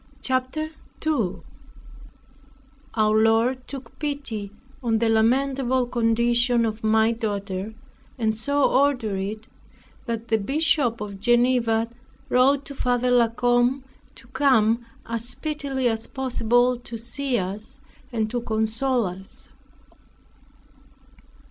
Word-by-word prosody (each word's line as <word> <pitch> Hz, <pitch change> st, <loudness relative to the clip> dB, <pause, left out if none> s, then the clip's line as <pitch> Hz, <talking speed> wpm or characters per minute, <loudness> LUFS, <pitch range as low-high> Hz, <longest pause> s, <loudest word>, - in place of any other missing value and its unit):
CHAPTER 260 Hz, +5 st, -1 dB, 0.3 s
2 260 Hz, -, -1 dB, 1.5 s
Our 215 Hz, -1 st, +3 dB
Lord 235 Hz, +3 st, +2 dB
took 275 Hz, -2 st, -9 dB
pity 275 Hz, -9 st, -4 dB, 0.3 s
on 230 Hz, -3 st, +1 dB
the 230 Hz, 0 st, +1 dB
lamentable 255 Hz, +3 st, +2 dB
condition 235 Hz, 0 st, +2 dB
of 220 Hz, 0 st, -4 dB
my 220 Hz, +1 st, +4 dB
daughter, 205 Hz, -2 st, -3 dB, 0.4 s
and 220 Hz, -3 st, +1 dB
so 285 Hz, +6 st, 0 dB
ordered 255 Hz, -9 st, +2 dB
it, 215 Hz, +3 st, -5 dB, 0.6 s
that 230 Hz, 0 st, -4 dB
the 220 Hz, -, +3 dB
Bishop 275 Hz, -1 st, +1 dB
of 200 Hz, -2 st, -6 dB
Geneva 240 Hz, 0 st, +2 dB, 0.4 s
wrote 270 Hz, +3 st, +3 dB
to 280 Hz, -, -8 dB
Father 250 Hz, -1 st, 0 dB
La 240 Hz, -2 st, +5 dB
Combe, 245 Hz, +3 st, +1 dB, 0.3 s
to 230 Hz, -, -13 dB
come 240 Hz, -5 st, +3 dB, 0.2 s
as 230 Hz, +1 st, -3 dB
speedily 275 Hz, -2 st, -2 dB
as 225 Hz, -1 st, -1 dB
possible 245 Hz, -1 st, +1 dB
to 240 Hz, -1 st, -7 dB
see 245 Hz, +3 st, -2 dB
us, 200 Hz, +6 st, -4 dB, 0.3 s
and 220 Hz, -3 st, 0 dB
to 245 Hz, -, -1 dB
console 230 Hz, +2 st, 0 dB
us. 190 Hz, +1 st, -7 dB
235 Hz, 110 wpm, -24 LUFS, 220-260 Hz, 1.5 s, La